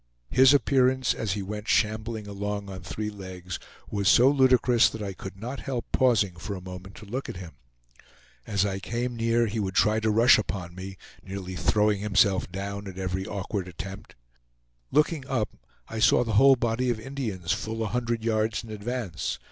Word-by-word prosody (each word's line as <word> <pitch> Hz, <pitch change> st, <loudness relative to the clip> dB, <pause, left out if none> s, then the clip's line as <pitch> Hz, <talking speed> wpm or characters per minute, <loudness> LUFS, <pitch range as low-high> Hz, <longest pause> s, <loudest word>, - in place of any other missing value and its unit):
His 130 Hz, 0 st, +7 dB
appearance, 130 Hz, -1 st, +3 dB
as 105 Hz, -4 st, -2 dB
he 100 Hz, -1 st, -3 dB
went 105 Hz, +2 st, -6 dB
shambling 110 Hz, 0 st, 0 dB
along 100 Hz, 0 st, -4 dB
on 95 Hz, -1 st, -7 dB
three 105 Hz, +4 st, -4 dB
legs, 95 Hz, -3 st, -7 dB, 0.3 s
was 100 Hz, -2 st, +1 dB
so 130 Hz, +3 st, +6 dB
ludicrous 125 Hz, -3 st, +4 dB
that 110 Hz, -, -6 dB
I 100 Hz, -1 st, -4 dB
could 95 Hz, +1 st, -9 dB
not 125 Hz, +6 st, -5 dB
help 125 Hz, -4 st, -4 dB
pausing 105 Hz, -8 st, +2 dB
for 100 Hz, +3 st, -5 dB
a -, -, -6 dB
moment 90 Hz, +1 st, -9 dB
to 105 Hz, -, -11 dB
look 125 Hz, +7 st, -4 dB
at -, -, -6 dB
him. 90 Hz, -3 st, -8 dB, 1.0 s
As 100 Hz, -1 st, +1 dB
I 95 Hz, -1 st, -2 dB
came 120 Hz, +4 st, -3 dB
near, 115 Hz, 0 st, +2 dB
he 110 Hz, 0 st, -3 dB
would 95 Hz, -2 st, -2 dB
try 105 Hz, +1 st, +4 dB
to 110 Hz, 0 st, 0 dB
rush 115 Hz, +3 st, +6 dB
upon 90 Hz, -4 st, -4 dB
me, 95 Hz, +1 st, -8 dB, 0.2 s
nearly 95 Hz, -1 st, -6 dB
throwing 105 Hz, +2 st, +2 dB
himself 100 Hz, -3 st, +2 dB
down 100 Hz, +1 st, -5 dB
at 95 Hz, -1 st, -8 dB
every 95 Hz, +1 st, -3 dB
awkward 100 Hz, -2 st, -3 dB
attempt. 95 Hz, +3 st, -8 dB, 0.7 s
Looking 150 Hz, -1 st, +2 dB
up, 125 Hz, -6 st, 0 dB, 0.4 s
I 115 Hz, -, -5 dB
saw 115 Hz, +2 st, +5 dB
the 115 Hz, -2 st, -3 dB
whole 135 Hz, +6 st, +7 dB
body 120 Hz, +1 st, 0 dB
of 120 Hz, -2 st, 0 dB
Indians 110 Hz, -10 st, -4 dB
full 110 Hz, +1 st, -2 dB
a -, -, -1 dB
hundred 120 Hz, -2 st, -1 dB
yards 110 Hz, 0 st, 0 dB
in 115 Hz, -, -10 dB
advance. 110 Hz, -5 st, -3 dB
105 Hz, 185 wpm, -27 LUFS, 95-120 Hz, 1.0 s, His